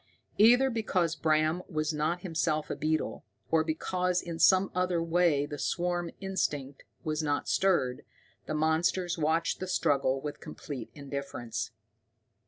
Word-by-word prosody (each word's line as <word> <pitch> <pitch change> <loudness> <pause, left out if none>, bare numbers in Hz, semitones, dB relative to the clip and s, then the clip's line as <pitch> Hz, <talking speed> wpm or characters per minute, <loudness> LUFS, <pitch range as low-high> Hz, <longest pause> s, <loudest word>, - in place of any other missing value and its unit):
Either 245 +5 +6
because 185 -7 0
Bram 155 +2 +2
was 155 -2 -1
not 155 +4 -1
himself 155 -3 -1
a - - -1
beetle, 155 -6 -1 0.3
or 160 -1 +4
because 180 +3 0
in 170 -2 -6
some 190 0 +5
other 180 -1 +1
way 165 -3 +2
the 145 0 -7
swarm 175 +1 -1
instinct 145 -8 -2 0.2
was 155 0 -1
not 145 -2 -1
stirred, 150 -10 +1 0.4
the 155 - -2
monsters 165 +3 +1
watched 160 +2 +1
the 185 - -4
struggle 135 -6 +1
with 145 +1 -6
complete 130 -6 -7
indifference. 140 -7 -5
160 Hz, 135 wpm, -30 LUFS, 150-180 Hz, 0.4 s, Either